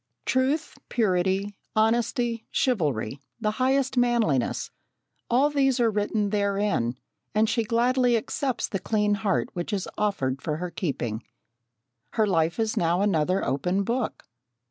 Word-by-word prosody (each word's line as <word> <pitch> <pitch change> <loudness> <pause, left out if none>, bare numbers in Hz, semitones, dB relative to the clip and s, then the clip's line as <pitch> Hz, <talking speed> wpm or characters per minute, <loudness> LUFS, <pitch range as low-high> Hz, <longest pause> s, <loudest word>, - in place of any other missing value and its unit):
Truth, 275 +5 0
purity, 195 -2 +1 0.2
honesty, 230 +1 +1
chivalry, 145 - 0 0.2
the 215 -2 0
highest 260 +3 +1
manliness 235 - +1 0.6
all 270 +5 +3
these 270 -3 +2
are 230 -2 +3
written 205 0 0
therein, 200 - 0 0.4
and 215 +1 +4
she 230 +1 +1
gladly 240 +2 +2
accepts 255 +3 -2
the 195 - -3
clean 210 +1 +1
heart 200 -1 0
which 175 +4 -4
is 195 -3 -2
offered 135 -11 0
for 150 -2 -2
her 180 +1 -4
keeping. 120 - -3 0.9
Her 220 - +3
life 165 -4 +1
is 220 -1 0
now 170 +2 +2
another 185 -1 +1
open 180 +9 0
book. 235 +2 -2
210 Hz, 130 wpm, -26 LUFS, 180-240 Hz, 0.9 s, and